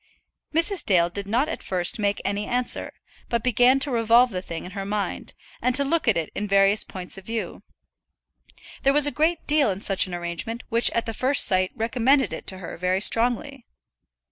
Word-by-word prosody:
Mrs. 335 +5 +2
Dale 175 -3 +2
did 200 +2 -6
not 245 +8 0
at 320 - -6
first 180 +3 0
make 205 -1 -2
any 205 +1 -2
answer, 250 0 -2 0.4
but 235 -2 -2
began 250 +2 +3
to 280 - 0
revolve 235 +1 +3
the 180 -2 -4
thing 165 -3 -7
in 180 - -10
her 195 0 -6
mind, 205 +1 -4 0.3
and 250 -1 +1
to 280 - +5
look 310 +1 -1
at 215 -6 +3
it 165 -2 -3
in 210 - -4
various 200 +1 +3
points 185 +1 -4
of 190 - -18
view. 225 0 -5 1.2
There 275 - +2
was 295 0 +6
a 290 - +3
great 320 +4 -1
deal 295 -4 +2
in 190 -1 -4
such 195 -1 0
an 180 - -6
arrangement 175 +7 -5
which 230 0 +3
at 230 - -2
the 225 - -5
first 260 +5 +4
sight 185 -1 +2
recommended 250 +4 +1
it - - -8
to 190 - -2
her 185 - -9
very 185 +2 -1
strongly. 245 +5 +1
225 Hz, 200 wpm, -23 LUFS, 195-255 Hz, 1.2 s, was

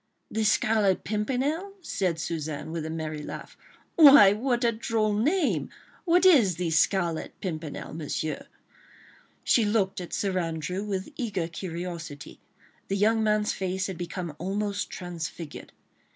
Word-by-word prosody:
"The 220 - 0
Scarlet 210 -2 +2
Pimpernel?" 270 - -1
said 185 - -1
Suzanne, 160 -2 -4
with 160 -1 -3
a - - -5
merry 155 -1 -4
laugh. - - -8 0.4
"Why! 275 - +9
what 240 +3 0
a 235 - +4
droll 220 -1 0
name! 295 - +1 0.4
What 355 +1 +4
is 245 - +6
the 170 -1 -2
Scarlet 170 0 +1
Pimpernel, 160 -6 -5
Monsieur?" 155 0 -4 1.0
She 235 - +4
looked 205 -3 0
at 175 - -8
Sir 190 -2 0
Andrew 165 +3 -3
with 195 -2 -3
eager 205 - -2
curiosity. 170 -4 -7 0.5
The 195 - -1
young 220 +3 +3
man's 210 -1 +1
face 190 0 -2
had 190 -3 -5
become 175 -2 -5
almost 200 +3 -2
transfigured. 170 -3 -7
190 Hz, 135 wpm, -27 LUFS, 165-220 Hz, 1.0 s, Why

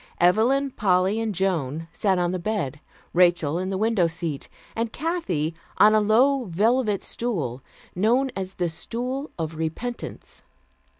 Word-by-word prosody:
Evelyn, 240 +10 +3
Polly 190 0 +2
and 220 -3 -2
Joan 165 -5 -1
sat 195 -3 +1
on 175 -1 +1
the 185 - -2
bed, 170 - -2 0.3
Rachel 175 -3 +3
in 185 +1 -2
the 195 - -1
window 215 -4 +2
seat, 165 -3 -4 0.3
and 230 0 -1
Kathy 195 - -2 0.2
on 215 +1 +7
a 215 - +5
low 250 +5 +3
velvet 210 +3 +1
stool, 155 - -3 0.3
known 240 +8 +2
as 190 0 -4
the 175 -1 0
"Stool 250 - -4
of 160 -1 -3
Repentance." 160 +10 -5
195 Hz, 140 wpm, -24 LUFS, 170-230 Hz, 0.3 s, on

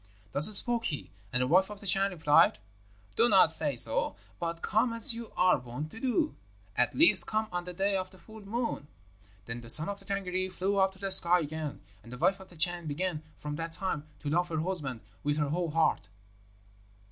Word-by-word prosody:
"Thus 140 +5 +8
spoke 235 +1 +4
he, 95 - -5 0.2
and 125 0 +1
the - - -2
wife 185 +7 +2
of 210 -1 -10
the 200 - -14
Chan 195 +1 +1
replied, 155 -5 +2 0.6
'Do 235 +1 +3
not 190 -5 +4
say 150 -4 +2
so, 115 -3 +4 0.2
but 170 0 -5
come 225 +3 0
as 230 0 +3
you 230 -1 -9
are 180 -5 +3
wont 125 +5 -8
to 225 - -11
do, 270 +6 -1 0.4
at - - 0
least 330 - +5
come 215 0 -2
on 175 0 -5
the 180 - -8
day 195 +2 -1
of 185 -1 -3
the 190 - -17
full 220 +3 -15
moon.' 230 - -5 0.6
Then 115 +2 -7
the 115 - -12
son 155 +8 +3
of 200 0 -6
the 195 - -20
Tângâri 185 -1 -4
flew 195 +2 -2
up 190 0 +1
to - - -19
the 195 0 -5
sky 180 -2 +3
again, 155 -1 -6 0.2
and 115 - -15
the 125 - -9
wife 185 +7 0
of 190 - -15
the 175 - -17
Chan 175 0 0
began 155 +1 -4 0.2
from 150 0 -7
that 165 0 -6
time 160 -5 -4
to 145 - -5
love 175 +2 0
her 160 -2 -3
husband 150 -10 -3 0.2
with 145 0 -1
her 150 -2 -1
whole 170 +2 -3
heart. 160 -9 0
180 Hz, 215 wpm, -28 LUFS, 150-195 Hz, 0.6 s, Thus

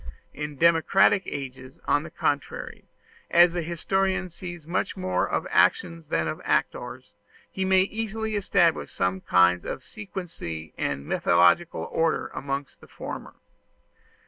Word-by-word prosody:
In 150 0 -5
democratic 170 +5 +4
ages, 130 -1 -7
on 145 - +2
the 170 - -8
contrary, 145 -3 -3 0.4
as 175 0 +6
the 175 - -1
historian 190 +3 -1
sees 175 -2 -8
much 175 +4 -2
more 185 0 0
of - - -1
actions 165 - +2
than 80 - 0
of 80 - -4
actors, - - -2 0.4
he 190 - -2
may 190 0 +5
easily 220 +1 -3
establish 175 -5 +2
some 95 +1 -1
kind 90 -1 +4
of - - -5
sequency 170 - -7
and 70 0 -2
methodical 90 - +3
order 165 -1 0
amongst 140 +1 -5
the - - -15
former. - - -8
165 Hz, 130 wpm, -26 LUFS, 135-190 Hz, 0.4 s, as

